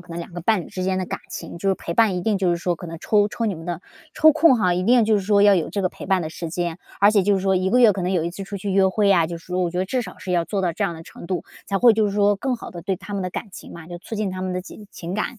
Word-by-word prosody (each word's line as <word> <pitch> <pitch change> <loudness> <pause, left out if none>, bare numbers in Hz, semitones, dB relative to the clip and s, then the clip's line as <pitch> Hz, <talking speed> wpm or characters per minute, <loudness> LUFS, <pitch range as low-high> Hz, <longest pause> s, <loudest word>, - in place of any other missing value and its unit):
可 180 -1 -16
能 165 - -5
两 170 - -9
个 175 - -6
伴 210 +2 +2
侣 - - -11
之 185 -1 -4
间 190 0 0
的 185 - -1
感 - - -4
情。 170 - -7
就 195 - -1
是 195 - +3
陪 170 - -6
伴 210 0 +3
一 - - -2
定 215 -3 +1
就 185 -2 +1
是 175 - +1
说， 175 0 -2
可 175 - -9
能 165 0 -7
抽 205 -1 +3
抽 225 +2 -3
你 205 - -1
们 165 +1 -10
的 175 -1 -4 0.3
抽 315 - +6
空 310 -3 +5
哈， 185 -5 +2
一 180 +1 -1
定 240 +1 +5
就 215 0 +3
是 200 - -1
说 200 +1 +3
要 205 -1 +7
有 165 - -1
这 200 - -2
个 185 - +2
陪 - - -10
伴 190 -2 +2
的 155 - -5
时 165 0 -6
间。 175 0 -3 0.2
而 205 +1 +7
且 205 -3 +3
就 200 +1 +3
是 190 - 0
说 190 0 +2
1 185 +1 0
个 245 +6 +3
月 230 -4 +7
可 195 - -4
能 180 +2 -1
有 175 -3 +1
1 170 - -2
次 195 +3 -7
出 200 +1 -6
去 200 +1 -4
约 195 0 +4
会 200 +2 +1
呀， 175 -4 +4
就 170 +1 -5
是 165 - -19
说 180 0 -3
我 175 - 0
觉 180 - -4
得 185 - +1
至 250 +6 -1
少 185 -4 -10
是 190 0 -7
要 175 -2 +2
做 200 +2 -2
到 175 -2 0
这 - - -2
样 170 - -2
的 160 - -10
程 170 - -12
度， 180 0 -3 0.2
才 195 - -1
会 240 +1 +6
就 215 -1 +2
是 200 - -2
说 205 0 +3
更 260 +4 -1
好 235 - -8
地 175 -5 -8
对 190 +2 -1
他 205 +3 -10
们 195 -1 -2
的 185 - -3
感 215 - -5
情 - - -11
嘛， 165 -1 -10
就 175 -1 -7
促 225 - -8
进 210 -2 -2
他 185 0 -6
们 185 0 -3
的 180 0 -3
情 210 +2 -12
情 170 +1 -6
感， 215 +3 -3
190 Hz, 395 characters per minute, -22 LUFS, 175-205 Hz, 0.3 s, 要